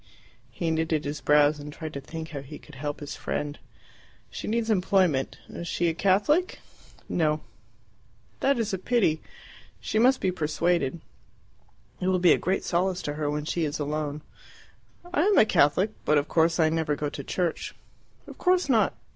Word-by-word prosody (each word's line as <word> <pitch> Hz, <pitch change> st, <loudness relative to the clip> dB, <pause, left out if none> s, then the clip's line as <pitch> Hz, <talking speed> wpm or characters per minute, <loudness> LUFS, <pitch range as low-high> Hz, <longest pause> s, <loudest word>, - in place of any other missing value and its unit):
He 165 Hz, -2 st, -2 dB
knitted 160 Hz, -1 st, 0 dB
his 145 Hz, +1 st, -4 dB
brows 150 Hz, 0 st, +4 dB
and 145 Hz, +1 st, -8 dB
tried 155 Hz, +1 st, -7 dB
to 140 Hz, -, -5 dB
think 160 Hz, +2 st, -7 dB
how 145 Hz, -4 st, -6 dB
he 140 Hz, +2 st, -10 dB
could 150 Hz, -, -16 dB
help 145 Hz, +2 st, -4 dB
his 145 Hz, -, -6 dB
friend. 145 Hz, 0 st, -4 dB, 0.7 s
"She -, -, -6 dB
needs 230 Hz, 0 st, 0 dB
employment. 180 Hz, -8 st, +2 dB
Is 170 Hz, -, -7 dB
she 170 Hz, 0 st, +1 dB
a -, -, -1 dB
Catholic?" 205 Hz, -, +2 dB, 0.5 s
"No." 155 Hz, -2 st, +1 dB, 1.0 s
"That 275 Hz, -1 st, +2 dB
is 220 Hz, -3 st, -1 dB
a 190 Hz, -, -1 dB
pity. 190 Hz, -8 st, +1 dB, 0.6 s
She 215 Hz, -, -1 dB
must 255 Hz, +3 st, +5 dB
be 185 Hz, -, +1 dB
persuaded. 165 Hz, -1 st, 0 dB, 1.0 s
It 180 Hz, -, -2 dB
will 185 Hz, -1 st, +3 dB
be 175 Hz, -2 st, +5 dB
a -, -, 0 dB
great 190 Hz, +2 st, 0 dB
solace 180 Hz, +1 st, 0 dB
to 145 Hz, -, -3 dB
her 150 Hz, -1 st, -2 dB
when 150 Hz, 0 st, -2 dB
she 170 Hz, +2 st, -1 dB
is 150 Hz, 0 st, -1 dB
alone." 150 Hz, 0 st, -3 dB, 0.9 s
"I 330 Hz, -, +3 dB
am 405 Hz, +4 st, +3 dB
a -, -, +7 dB
Catholic, 185 Hz, +2 st, +3 dB
but 150 Hz, -, +3 dB
of 145 Hz, +1 st, +1 dB
course 165 Hz, +1 st, +2 dB
I 160 Hz, -1 st, +4 dB
never 160 Hz, -2 st, 0 dB
go 150 Hz, +1 st, -2 dB
to 140 Hz, -, -6 dB
church." 175 Hz, +3 st, -2 dB, 0.5 s
"Of -, -, -12 dB
course 365 Hz, -4 st, +2 dB
not. 220 Hz, -6 st, +3 dB
160 Hz, 180 wpm, -26 LUFS, 150-190 Hz, 1.0 s, a